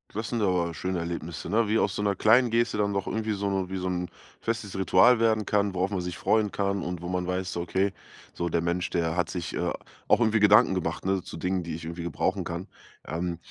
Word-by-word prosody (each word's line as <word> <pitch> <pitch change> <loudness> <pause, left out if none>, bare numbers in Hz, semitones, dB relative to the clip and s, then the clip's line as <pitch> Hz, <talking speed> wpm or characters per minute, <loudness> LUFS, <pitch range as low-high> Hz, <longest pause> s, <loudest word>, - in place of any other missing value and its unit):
Das 110 +1 -3
sind 120 -2 -1
aber 90 -4 +1
schöne 95 +2 -3
Erlebnisse, 85 -1 -5
ne? 110 0 +3
Wie 110 - +3
aus 100 -3 +1
so - - -2
'ner 100 -1 +1
kleinen 120 +5 +5
Geste 115 -1 +1
dann 100 -1 +1
doch 100 -1 -1
irgendwie 110 -1 -2
so 100 0 -2
no 95 -2 -1
wie 95 - -3
so 95 0 -3
'n 90 -1 -2 0.3
festes 110 -3 -3
Ritual 95 +6 +5
werden 110 -2 +2
kann, 100 -2 +1
worauf 95 +2 0
man 95 -3 -1
sich 90 0 -5
freuen 110 -1 +2
kann 100 -1 -1
und 90 -1 -4
wo - - -4
man 90 -1 -1
weiß 90 0 -2
so: 85 - -2
„Okay, 95 +3 0 0.4
so 85 - -2
der 85 0 +1
Mensch, 85 +1 -1
der 80 -1 0
hat 90 -3 0
sich, 85 -2 -4
äh, - - 0 0.4
auch - - +5
irgendwie 110 -2 +3
Gedanken 105 -2 +6
gemacht, 80 -2 -3
ne, 95 -1 +1
zu 80 - -9
Dingen, 90 +2 -1
die 85 -2 -5
ich 80 - -8
irgendwie 85 +1 -5
gebrauchen 85 -2 -1
kann.“ - - -5 0.4
Ähm, 85 +2 -3
95 Hz, 245 wpm, -27 LUFS, 85-105 Hz, 0.4 s, Gedanken